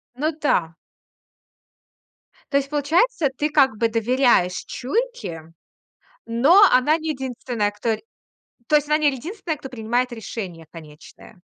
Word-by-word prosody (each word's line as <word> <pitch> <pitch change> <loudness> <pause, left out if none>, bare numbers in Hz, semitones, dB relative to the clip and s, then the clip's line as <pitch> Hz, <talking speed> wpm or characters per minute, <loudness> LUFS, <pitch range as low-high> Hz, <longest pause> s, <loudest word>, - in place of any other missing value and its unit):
Ну 305 +5 -1
да. 165 - +1 1.8
То 280 - +3
есть 275 0 -2
получается, 305 - +1
ты 300 +3 0
как 270 -7 +3
бы 230 - +2
доверяешь 230 -5 +2
чуйке, 425 - -3 0.8
но 280 - +5
она 295 +6 +4
не 320 0 -5
единственная, 245 -6 -3
кто 220 +2 -1
рь - - -15 0.7
то 305 - +3
есть 295 -1 +2
она 300 0 +3
не 300 -2 +2
единственная, 320 - -5
кто 265 - -9
принимает 245 +1 -1
решение 190 -7 -7
конечное. 160 +4 -14
255 Hz, 130 wpm, -22 LUFS, 220-300 Hz, 1.8 s, но